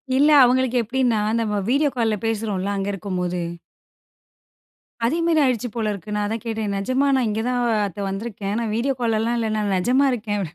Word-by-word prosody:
இல்ல, 290 +3 +5
அவங்களுக்கு 255 0 +2
எப்டின்னா, 240 -2 +1 0.2
நம்ம 210 -2 -1
வீடியோ 285 +2 +3
கால்ல 225 -3 +1
பேசுறோல 205 -3 -1
அங்க 195 0 -2
இருக்கும்போது. 180 -2 -3 1.7
அதே 310 +8 +1
மாரி 330 -2 +3
ஆயிருச்சு 245 -2 0
போல 220 -2 -1
இருக்கு, 210 +2 -7
நான் 210 - 0
அதான் 225 +1 -3
கேட்டேன், 220 -3 -2
நிஜமா 255 +7 +1
நான் 250 -4 +1
இங்க 215 +1 -1
தான் 245 -1 0 0.3
அத்த 195 +2 -10
வந்துருக்கேன் 205 0 -4
நான் 220 -2 -2
வீடியோ 265 +4 0
கால்லாம் 225 +1 +1
இல்ல. 225 -1 -1
நான் 205 -2 0
நிஜமா 255 +9 +3
இருக்கேன். 210 -3 -2
225 Hz, 170 wpm, -22 LUFS, 205-250 Hz, 1.7 s, இல்ல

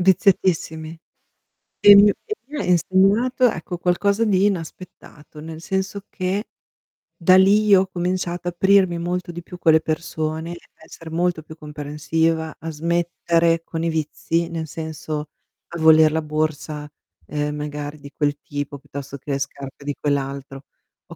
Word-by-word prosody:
Viziatissimi. 175 -4 +2 0.9
E 205 0 +10
mi 205 +1 +8
e 425 - -3
mi 295 +1 -7
ha - - -1
insegnato, 195 - +3
ecco, 175 -1 -5
qualcosa 200 +5 +1
di 200 -2 +3
inaspettato, 165 -4 -6
nel 160 0 -8
senso 190 +2 -3
che 190 +3 -2 0.7
da 185 +2 +5
lì 200 +3 +5
io 195 -2 +7
ho 190 - -2
cominciato 175 -1 -3
a - - -6
aprirmi 190 0 +3
molto 175 0 -3
di 175 +1 -7
più 180 - -11
con 165 - +4
le 160 - +6
persone, 160 +1 -3
a - - -5 0.3
essere 165 0 -11
molto 170 0 0
più 155 +1 -12
comprensiva, 155 +2 -2
a 165 - -6
smettere 170 +1 +1
con 165 -1 -4
i 165 - +1
vizi, 160 +1 -1
nel 165 -1 -4
senso, 155 -1 -5 0.4
a 170 - -6
voler 160 -1 +7
la 160 +1 0
borsa, 155 -1 -3 0.4
ehm, 150 0 -2
magari 150 0 -5
di 140 0 -11
quel 145 -1 0
tipo, 145 -1 -5
piuttosto 140 0 -8
che 140 +2 -7
le 140 - 0
scarpe 135 0 -7
di 145 -1 -2
quell'altro. 140 -1 -3 0.4
Ho - - -11
165 Hz, 155 wpm, -22 LUFS, 150-180 Hz, 0.9 s, E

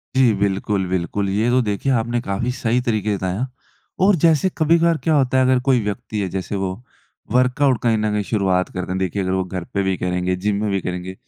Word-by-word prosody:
जी, 130 -4 +5
बिल्कुल, 100 0 0
बिल्कुल 95 +2 -1
ये 105 +5 +1
तो 125 +1 +3
देखिए 105 +4 -1
आपने 120 -1 0
काफ़ी 115 +3 -2
सही 120 0 0
तरीके 110 -4 0
बताया 95 +6 -2 0.6
और 200 0 +5
जैसे 165 +2 +4
कभी-कभार 165 +1 +3
क्या 160 - +2
होता 130 -2 +2
है, 130 - +4
अगर 130 0 +3
कोई 130 -2 +4
व्यक्ति 105 +1 -4
है 95 - -1
जैसे 95 +2 -4
वो 95 -1 -2 0.6
वर्कआउट 125 +1 +2
कहीं 115 -2 +3
ना 105 0 0
कहीं 105 0 0
शुरुआत 95 -3 0
करते 90 0 -5
हैं, 95 - -1
देखिए 95 +1 -1
अगर 95 -1 -1
वो 95 0 +1
घर 90 -1 -5
पे 100 - +1
भी 95 -1 0
करेंगे, 90 0 -1
जिम 100 +3 -1
में 105 - 0
भी 95 -1 0
करेंगे। 90 +1 -5
105 Hz, 220 wpm, -20 LUFS, 95-125 Hz, 0.6 s, जी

